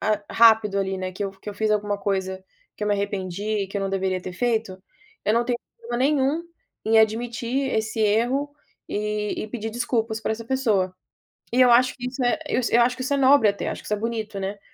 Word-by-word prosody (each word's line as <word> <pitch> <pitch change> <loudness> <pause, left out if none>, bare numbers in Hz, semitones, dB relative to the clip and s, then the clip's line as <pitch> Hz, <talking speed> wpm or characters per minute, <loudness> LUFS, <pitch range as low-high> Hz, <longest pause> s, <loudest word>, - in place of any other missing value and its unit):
ah, 210 0 0
rápido, 220 -3 +5
ali, 190 0 -1
né, 185 0 -4
que 195 +2 -4
eu 195 - -3
que 195 +2 -12
eu - - -10
fiz 215 +1 0
alguma 205 -1 0
coisa 190 -2 -2 0.3
que 210 - -3
eu - - -1
me 205 - +3
arrependi, 200 -2 -3 0.2
e - - -3
que 200 - -5
eu - - -1
não 195 0 -2
deveria 190 -1 -1
ter 180 - -7
feito, 220 -3 -1 0.4
eu 210 - +2
não 235 +1 +2
tenho 240 0 -1 0.2
problema 240 +1 -5
nenhum 280 +3 +2 0.4
em 225 +1 +4
admitir 235 +4 +1
esse 220 0 -1
erro 240 +7 +2 0.4
e 210 0 -2
e - - -5
pedir 225 0 -4
desculpas 225 -1 -1
pra 220 - -1
essa 225 +1 -6
pessoa. 220 -8 +1 0.6
E 255 - +3
eu 250 - +7
acho 250 +2 +5
que 245 - -5
isso 255 +1 -4
é 245 +6 +2
eu - - +1
s 235 - -1
eu 240 - +6
acho 250 +1 +2
que 255 - -5
isso 270 +2 0
é - - +2
nobre 270 -4 +5
até, 200 0 -1
acho - - -4
que - - -14
isso 210 - 0
é - - -1
bonito, 220 -2 -3
né. 195 +1 -4
220 Hz, 240 wpm, -24 LUFS, 200-240 Hz, 0.6 s, eu